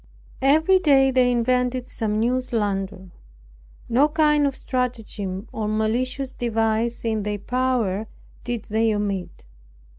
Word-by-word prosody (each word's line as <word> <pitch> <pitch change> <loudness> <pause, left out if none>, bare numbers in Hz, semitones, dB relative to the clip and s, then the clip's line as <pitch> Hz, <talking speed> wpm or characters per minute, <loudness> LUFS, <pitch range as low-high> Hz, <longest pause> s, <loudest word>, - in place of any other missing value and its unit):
Every 315 +8 +4
day 270 -5 +4
then 255 -1 +3
invented 250 +1 +1
some 215 -2 -2
new 250 +3 +1
slander. 195 -6 -3 0.8
No 260 +6 +4
kind 300 -2 +3
of 275 - -3
stratagem, 225 -6 -3
or 215 -1 -3
malicious 250 +5 -1
device 225 0 -1
in 220 -2 0
their 205 0 -2
power, 235 -4 -1 0.4
did 240 -3 -4
they 220 0 +2
omit. 200 - -4
235 Hz, 120 wpm, -23 LUFS, 215-255 Hz, 0.8 s, Every